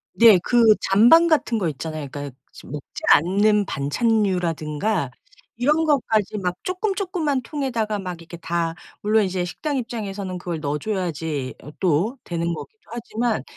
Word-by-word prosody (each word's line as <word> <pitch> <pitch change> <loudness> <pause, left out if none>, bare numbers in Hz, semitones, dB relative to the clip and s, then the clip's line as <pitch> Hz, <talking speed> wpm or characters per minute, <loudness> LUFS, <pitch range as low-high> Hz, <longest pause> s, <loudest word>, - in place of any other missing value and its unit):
네 230 -4 +8
그 240 -1 +3 0.2
잔반 240 - +6
같은 290 -8 +2
것 180 -6 0
있잖아요. 155 0 -5
그러니까 145 -2 -7
이제 - - -14
먹지 145 0 -8
않는 205 +5 +4
반찬류라든가 180 - 0 0.5
이런 300 +6 +2
것까지 220 -9 +1
막 180 -3 -2
쪼끔 370 +3 -1
쪼끄만 345 -9 -1
통에다가 235 -6 -2
막 180 -3 -6
이렇게 170 +1 -10
다 165 -1 -2 0.3
물론 215 +1 +3
이제 185 -2 -1
식당 290 - -3
입장에서는 205 -6 -4
그걸 175 -2 -4
넣어줘야지 155 -3 -3
어 150 - -10
또 190 - +1
되는 170 0 -2
거기도 155 +7 -9
하지만 235 0 -2
200 Hz, 330 characters per minute, -23 LUFS, 165-235 Hz, 0.5 s, 네